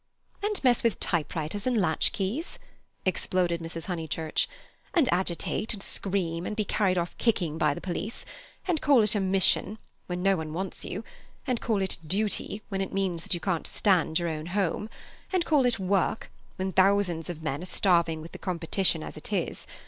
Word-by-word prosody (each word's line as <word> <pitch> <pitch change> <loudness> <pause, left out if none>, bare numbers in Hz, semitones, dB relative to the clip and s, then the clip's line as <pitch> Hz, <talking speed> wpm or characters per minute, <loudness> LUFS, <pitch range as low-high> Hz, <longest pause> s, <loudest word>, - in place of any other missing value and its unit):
"And 415 0 +1
mess 245 -3 +5
with 230 -3 +1
typewriters 165 +4 -1
and 245 -3 +3
latch 160 -5 +3
keys," 215 - -3 0.5
exploded 180 -2 +1
Mrs. 165 0 -5
Honeychurch. 160 -3 -1 0.5
"And 320 -7 +5
agitate 185 +5 -1
and 195 - -9
scream, 180 -3 -2
and 210 - -3
be 215 -1 0
carried 190 -2 +2
off 175 0 -1
kicking 175 -9 +1
by 150 -3 +3
the - - -7
police. 195 +5 -4 0.4
And 335 -4 +1
call 275 -6 +6
it 210 +1 +2
a 210 - +1
Mission—when 190 -1 0
no 195 0 +5
one 155 -1 -4
wants 190 +2 -4
you! 200 +5 -4 0.4
And 250 -2 0
call 215 -4 +1
it 190 - -1
Duty—when 205 +1 -1
it 195 - -2
means 190 -4 0
that 175 - -1
you - - -3
can't 180 -3 -1
stand 175 -6 +2
your 175 -1 0
own 155 0 -4
home! 200 +3 0 0.4
And 365 -3 +2
call 285 -5 +4
it 245 - +1
Work—when 190 0 -1
thousands 190 -3 +3
of 160 -2 -6
men 145 0 -2
are - - -5
starving 170 -4 +2
with 165 - -10
the - - -9
competition 175 -1 +1
as - - -7
it - - -7
is! - - -2
190 Hz, 180 wpm, -28 LUFS, 170-210 Hz, 0.5 s, call